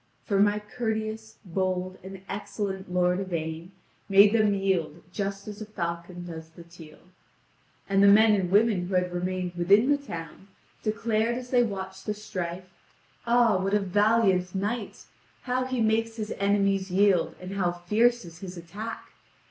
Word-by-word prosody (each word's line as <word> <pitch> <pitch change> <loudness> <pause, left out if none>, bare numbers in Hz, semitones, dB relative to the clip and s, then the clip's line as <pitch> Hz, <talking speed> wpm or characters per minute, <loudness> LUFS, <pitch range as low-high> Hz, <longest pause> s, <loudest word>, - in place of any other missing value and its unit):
For 200 -5 +1
my 205 +1 +4
courteous, 220 0 -4
bold, 185 0 -2
and 190 0 -9
excellent 200 -2 -4
lord 180 0 +2
Yvain 165 -2 -4 0.4
made 200 +2 +7
them 215 -3 +3
yield 180 -5 -1
just 200 +1 -4
as 210 +1 -8
a - - -4
falcon 175 -2 -5
does 160 -2 -8
the 170 +1 -13
teal. 165 -2 -14 0.9
And 195 0 +3
the 200 - +7
men 215 +2 +7
and 190 -3 +1
women 200 -2 +3
who 185 - -2
had 180 -1 +1
remained 180 0 -2
within 200 +9 +4
the 285 - +3
town 175 -7 -8 0.3
declared 225 +1 0
as 250 0 -8
they 250 -1 +5
watched 190 -4 -4
the 210 - -1
strife: 185 -4 -5 0.6
"Ah, 235 -4 +4
what 195 +2 0
a - - +4
valiant 195 -2 +2
knight! 205 +3 -3 0.4
How 255 0 -1
he 255 -2 -2
makes 225 +1 +1
his 215 -1 -4
enemies 200 -1 +1
yield, 190 -1 +3
and 185 +1 -7
how 185 -3 +1
fierce 210 +7 +1
is 165 0 -12
his 185 -1 -8
attack! 205 +7 -7
195 Hz, 160 wpm, -27 LUFS, 180-215 Hz, 0.9 s, made